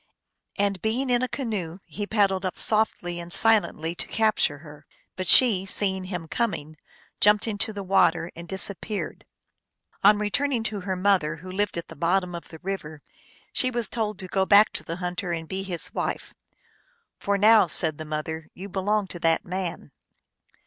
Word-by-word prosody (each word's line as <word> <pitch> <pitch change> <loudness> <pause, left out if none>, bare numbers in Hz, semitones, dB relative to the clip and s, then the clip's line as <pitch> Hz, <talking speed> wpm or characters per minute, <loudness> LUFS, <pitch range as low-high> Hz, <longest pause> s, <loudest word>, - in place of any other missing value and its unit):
And 200 -3 0
being 250 +4 -1
in 245 0 +3
a 255 - 0
canoe 215 - -4
he 205 -1 -5
paddled 200 -3 +1
up 185 - -3
softly 195 -5 +1
and 170 0 -8
si 225 - +4
lently 170 -7 +1
to - - -2
capture 215 -9 +1
her; 150 0 -14 0.3
but 185 -1 -4
she, 215 -5 +6
seeing 190 -1 0
him 180 -3 -5
coming, 155 -8 -2 0.4
jumped 210 +2 +5
into 215 0 0
the 200 -2 -6
water 175 -3 +2
and 170 +1 -9
disappeared. 200 +2 -3 0.8
On 205 +1 +7
return 270 +8 0
ing 230 -3 0
to 215 -2 -3
her 190 0 -3
mother, 185 -5 +1
who 185 +3 -10
lived 200 -1 -1
at 170 - -5
the 165 - -11
bottom 180 +3 0
of 170 - -7
the 160 - -11
river, 160 -6 -5 0.5
she 255 - +1
was 240 -4 -1
told 215 -3 -2
to 190 -1 -7
go 190 +1 +1
back 205 +2 +5
to - - -2
the 165 +2 -5
hunter 180 0 -4
and 165 -1 -4
be 190 +3 -4
his 185 -3 -2
wife; - - -3 0.4
" 485 -2 -41
for 200 0 0
now," 215 -1 +6
said 160 -1 +3
the - - -4
mother, 155 +1 -5
" - - -61
you 195 +2 -8
belong 205 +2 0
to 180 -2 -9
that 165 -1 +1
man." 180 -4 -4
190 Hz, 190 wpm, -25 LUFS, 170-210 Hz, 0.8 s, On